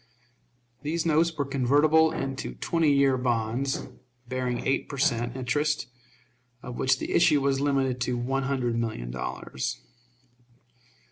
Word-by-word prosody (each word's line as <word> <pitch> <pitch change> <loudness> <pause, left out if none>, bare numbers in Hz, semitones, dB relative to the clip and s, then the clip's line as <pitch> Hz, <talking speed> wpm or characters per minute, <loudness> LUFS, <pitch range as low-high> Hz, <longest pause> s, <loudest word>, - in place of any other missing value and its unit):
These 160 +3 -2
notes 165 +1 +3
were 145 - 0
convertible 145 +4 +3
into 135 -3 -4
twenty 165 -3 +1
year 140 -2 +3
bonds, 120 +2 -1 0.4
bearing 125 -1 -2
eight 135 - 0
per 140 - -6
cent. 120 -2 +1
interest, 145 +4 0 0.8
of 125 - -7
which 130 - +2
the - - -5
issue 170 -4 +4
was 135 0 +1
limited 135 -3 +1
to 125 0 0
one 135 +3 -1
hundred 130 -4 -1
million 110 - -3
dollars. 65 +1 -4
135 Hz, 130 wpm, -27 LUFS, 120-145 Hz, 0.8 s, issue